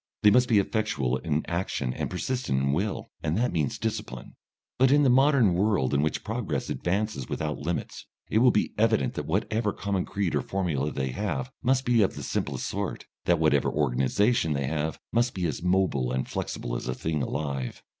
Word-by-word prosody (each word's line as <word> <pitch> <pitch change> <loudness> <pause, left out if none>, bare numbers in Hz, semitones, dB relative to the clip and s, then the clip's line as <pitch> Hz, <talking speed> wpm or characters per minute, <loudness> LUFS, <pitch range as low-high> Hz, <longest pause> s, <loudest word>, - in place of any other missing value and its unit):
They 105 - +8
must 125 +3 +4
be 110 - +5
effectual 100 - 0
in 75 +1 -1
action 85 -7 -2
and - - -3
persistent 95 - -1
in 70 +1 +1
will, 100 +7 -2
and 80 +2 -1
that 125 +2 +1
means 75 -6 0
discipline. 60 0 -4 0.4
But 130 0 +6
in 145 +2 +5
the 130 - +5
modern 135 -6 +5
world 95 -8 +1
in 70 - +3
which 75 0 -1
progress - - -3
advances 95 - -2
without 75 -1 -2
limits, 85 +3 -4 0.2
it 110 - +2
will 125 +2 +6
be 105 - +1
evident 110 - +2
that - - -5
whatever 105 +5 0
common 100 -2 -2
creed 100 -4 -2
or 75 - +1
formula 80 -5 -1
they 65 -2 -2
have 105 - -3
must 130 0 +2
be 120 -2 +4
of 100 - +2
the - - -6
simplest - - -2
sort; - - -3 0.2
that 85 - +4
whatever 80 -3 +3
organisation 75 - +1
they 70 -1 -1
have 80 +2 -2
must 120 +1 +1
be 90 -2 -1
as 80 - -2
mobile 90 -9 +1
and 65 0 -1
flexible - - -4
as - - -4
a 65 - -1
thing 80 -2 -2
alive. 70 -3 -3
90 Hz, 195 wpm, -27 LUFS, 70-110 Hz, 0.4 s, They